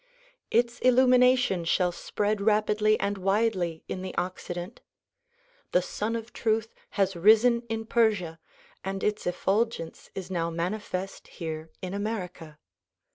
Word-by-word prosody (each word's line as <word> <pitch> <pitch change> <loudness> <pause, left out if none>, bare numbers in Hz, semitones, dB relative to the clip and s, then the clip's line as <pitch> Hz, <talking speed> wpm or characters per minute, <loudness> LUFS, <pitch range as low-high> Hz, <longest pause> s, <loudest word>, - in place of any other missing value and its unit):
Its 235 +1 +1
illumination 250 -6 +4
shall 180 +2 +2
spread 205 +3 -2
rapidly 215 0 +3
and 200 0 -1
widely 190 -4 0
in 185 - -4
the 185 0 -6
Occident. 180 +2 -4 0.9
The 180 - +5
Sun 215 +5 -3
of 230 +1 -6
Truth 225 0 0 0.2
has 195 -1 +2
risen 220 +6 +5
in 225 0 -3
Persia 210 -9 +1 0.4
and 195 0 -4
its 210 -3 -1
effulgence 190 -1 -1
is 190 -1 -6
now 170 -2 0
manifest 185 +2 -4
here 160 -1 -6
in 185 0 -4
America. 185 -7 -4
200 Hz, 125 wpm, -27 LUFS, 180-225 Hz, 0.9 s, The